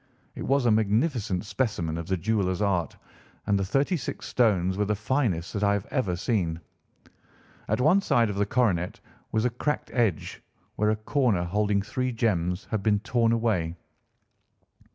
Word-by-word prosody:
It - - -8
was 135 -1 +2
a 120 - +4
magnificent 110 - +1
specimen 100 -9 -1
of 85 0 -5
the 95 - 0
jeweller's 95 -1 0
art, 90 -7 0 0.5
and 100 -1 +2
the - - 0
thirty 135 - +1
six 135 -11 -5
stones 95 -6 +2
were 105 +1 0
the 105 +1 0
finest 105 - -1
that 105 - -2
I 100 0 +3
have 100 -1 -2
ever 105 -10 0
seen. 85 -4 -1 1.1
At - - 0
one 160 +10 +4
side 115 - +2
of 100 - -5
the 100 0 +1
coronet 100 -8 0 0.3
was 110 +1 +1
a 125 - +2
cracked 150 +5 -2
edge, 115 -10 0 0.3
where 105 0 +1
a 110 - +2
corner 110 -4 +1
holding 100 +2 0
three 125 +5 -2
gems 95 -5 0
had 110 - 0
been 105 0 +2
torn 115 0 +1
away. 105 -8 0
105 Hz, 170 wpm, -26 LUFS, 95-120 Hz, 1.1 s, a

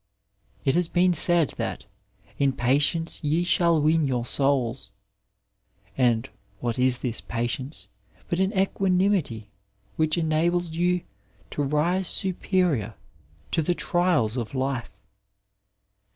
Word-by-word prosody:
It 135 - +3
has 175 0 +1
been 180 +1 +2
said 170 -2 +5
that - - -3
^* - - -17 0.6
in 140 -1 +2
patience 145 +8 0
ye 155 +4 +1
shall 170 -2 +3
win 155 0 +2
yonr 125 -3 -1
souls,'* 130 -5 0 1.0
and 120 -3 +2 0.3
what 120 0 -3
is 125 -1 +4
this 120 -2 -4
patience 120 +5 -4 0.4
but 170 - -2
an 190 +1 +2
equanimity 185 - 0 0.5
which 155 0 +1
enables 170 +1 0
you 175 +2 +1 0.5
to - - -3
rise 160 +6 0
superior 180 - 0 0.6
to 165 - +1
the 175 +3 0
trials 170 -13 +1
of 120 +2 -4
life 125 -7 -3
155 Hz, 120 wpm, -25 LUFS, 125-175 Hz, 1.0 s, said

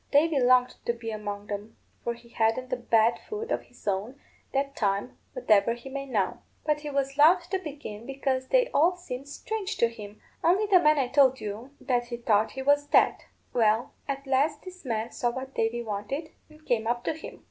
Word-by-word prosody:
Davy 295 0 +4
longed 250 0 +4
to 235 - +2
be 230 -1 -6
among 205 -1 -5
'em 205 +2 -6 0.3
(for 235 0 -2
he 235 0 -18
hadn't 235 +2 0
a - - +3
bad 235 -1 +2
foot 445 +3 -4
of - - +1
his 245 - -20
own, 205 +8 -2 0.3
that 275 0 -1
time, 200 +3 -1 0.2
whatever 215 - +3
he 240 +3 -10
may 275 +1 -5
now); 235 0 -1 0.2
but 300 -1 +1
he 300 0 -6
was 275 0 -2
loth 340 +4 +6
to 385 - +1
begin, 280 - -8
because 265 -1 -1
they - - +4
all 340 +5 +3
seemed 275 -7 -7
strange 425 +6 -4
to 235 - +3
him, 210 -2 -10 0.2
only 375 +5 +4
the 390 -3 +6
man 305 -3 +4
I 265 -3 +2
told 265 -1 +4
you 215 +5 -6
that 245 -2 0
he 240 0 -5
thought 220 -2 +2
was 290 +1 +3
dead. - - +3 0.3
Well, 225 +2 +2
at 275 0 -3
last 285 +3 +1
this 370 -1 -11
man 225 -1 -2
saw 240 - 0
what 260 +2 -6
Davy 230 +1 0
wanted, 225 +9 -4 0.2
and 310 0 -19
came 225 -2 0
up 240 0 0
to - - 0
him. 315 - -10
255 Hz, 200 wpm, -27 LUFS, 225-290 Hz, 0.3 s, loth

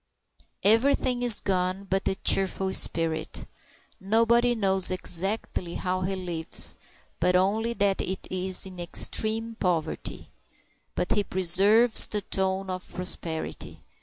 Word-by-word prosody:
Everything 245 +3 +2
is 240 -4 +5
gone 185 0 -1
but 195 +1 -1
the 190 - 0
cheerful 190 -1 +2
spirit. 160 -1 0 0.5
Nobody 230 +4 +2
knows 190 -3 +4
exactly 185 0 -2
how 185 0 -2
he 190 +1 -2
lives, 175 -3 -3 0.4
but 180 +2 +2
only 215 +5 +1
that 200 -3 0
it 190 +1 -5
is 185 0 0
in 185 -2 -9
extreme 220 +6 -1
poverty. 165 -4 -3 0.6
But - - -2
he 205 - +2
preserves 200 +6 +3
the 210 - -2
tone 190 0 -1
of 185 0 -7
prosperity. 175 -3 -4
190 Hz, 120 wpm, -26 LUFS, 180-215 Hz, 0.6 s, is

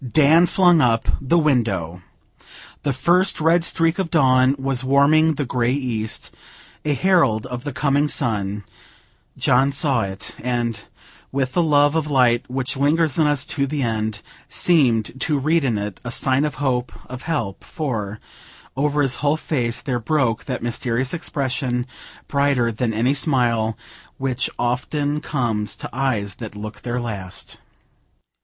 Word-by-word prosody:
Dan 160 +3 +5
flung 175 -4 +4
up 115 -3 +2
the 140 +5 +2
window. 110 - 0 0.8
The 145 - 0
first 175 +9 +2
red 165 +2 +3
streak 165 +1 +1
of 185 -3 -1
dawn 130 -3 +4
was 135 -1 -2
warming 150 +4 +4
the 145 - -2
grey 120 0 0
east, 120 -6 -2 0.5
a 150 -1 0
herald 135 - +2
of 125 -1 -6
the 145 - -3
coming 145 +2 +1
sun; 105 -7 -1 0.7
John 135 +3 +3
saw 135 -4 +2
it, 95 0 -5
and 120 -3 -1 0.5
with 130 -1 -1
the 175 - +2
love 145 -2 +3
of 160 -2 -1
light 125 -4 +2
which 130 +2 -2
lingers 150 +2 +1
in 155 - +4
us 145 -2 +1
to 140 -2 0
the 145 0 -2
end, 110 -3 -2 0.3
seemed 130 -7 +2
to 150 -2 +1
read 155 +4 +1
in 120 -5 0
it 100 -1 -5
a 125 - -5
sign 130 +3 +1
of 150 - -3
hope 125 -3 -1
of 130 0 -8
help, 140 - -3
for, 110 -9 -4 0.6
over 145 +2 +1
his 130 -2 +1
whole 145 +1 +1
face 120 -7 -1
there 130 -4 -2
broke 125 -2 0
that 125 -4 -4
mysterious 120 +2 -1
expression, 130 -6 -2 0.4
brighter 140 -4 +1
than 115 +1 -1
any 115 +5 +1
smile, 120 -7 +1 0.4
which 130 -2 -1
often 145 +5 -1
comes 110 -9 -2
to - - -7
eyes 120 -7 -1
that 110 -2 -7
look 105 +1 -8
their 125 0 -3
last. 100 -6 -6
130 Hz, 150 wpm, -21 LUFS, 115-150 Hz, 0.8 s, Dan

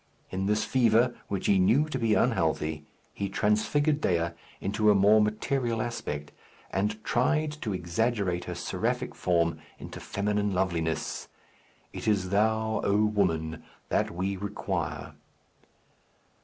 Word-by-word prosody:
In 95 +1 -1
this 105 +1 +1
fever, 120 -1 +3
which 100 -2 -3
he 100 - +4
knew 130 +11 +4
to 135 -4 -3
be 115 -2 +2
unhealthy, 80 -9 0 0.3
he 100 -1 -3
transfigured 125 +10 +1
Dea 85 -1 +1 0.3
into 105 +2 +1
a 105 - +6
more 105 +2 +6
material 115 +2 0
aspect, 75 -11 -4 0.4
and 105 +3 -1
tried 155 +7 +1
to 110 - -2
exaggerate 90 0 -1
her - - -5
seraphic - - -2
form 85 -2 +1 0.2
into - - -8
feminine 105 0 -1
loveliness. 85 -4 -1 0.7
It - - -6
is 95 -4 +1
thou, 110 +2 +1
O 105 +2 +3
woman, 85 -7 0 0.3
that - - +1
we 95 +3 -2
require. 95 -5 -3
105 Hz, 130 wpm, -28 LUFS, 90-110 Hz, 0.7 s, a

